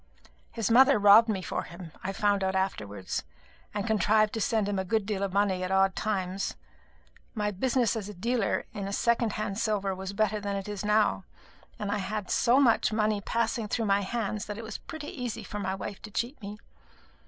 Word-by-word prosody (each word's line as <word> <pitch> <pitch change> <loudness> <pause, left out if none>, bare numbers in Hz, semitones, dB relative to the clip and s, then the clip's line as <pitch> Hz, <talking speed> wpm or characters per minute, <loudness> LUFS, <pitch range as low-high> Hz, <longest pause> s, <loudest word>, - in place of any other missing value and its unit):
His 225 -1 -2
mother 265 +3 +7
robbed 210 +3 +7
me 195 -3 -1
for - - -2
him, 170 -1 -10
I 190 - -2
found 200 0 +1
out 190 0 0
afterwards, 105 - -2 0.5
and 205 -1 -3
contrived 215 0 +3
to 225 - -2
send 215 -1 +1
him 200 -1 -1
a - - 0
good 210 +2 0
deal 200 -1 -2
of 200 -1 -1
money 195 -1 +1
at 185 - -2
odd 190 0 +3
times. 195 -2 -2 0.8
My 210 -1 0
business 240 +2 +1
as 210 -2 -4
a 210 - -8
dealer 230 +3 0
in 200 -2 -4
second 235 0 +1
hand 210 -1 -3
silver 210 -4 0
was 190 +1 -6
better 215 +1 +1
then 200 -1 -3
than 200 - -1
it 195 - -8
is 205 -1 -4
now, 210 -2 +2 0.5
and 205 -1 -3
I 205 - 0
had 195 +2 -4
had 210 -3 -4
so 245 +3 +4
much 235 -5 +4
money 215 -1 +1
passing 230 +1 -1
through 225 +2 -1
my 200 0 +3
hands 215 0 -2
that 210 -1 -5
it 230 - -6
was 220 0 -6
pretty 315 -2 -7
easy 245 -4 -5
for 210 - -6
my 190 -1 -2
wife 195 +1 -6
to 215 - -9
cheat 235 +7 -3
me. 205 +1 -7
205 Hz, 210 wpm, -28 LUFS, 195-220 Hz, 0.8 s, mother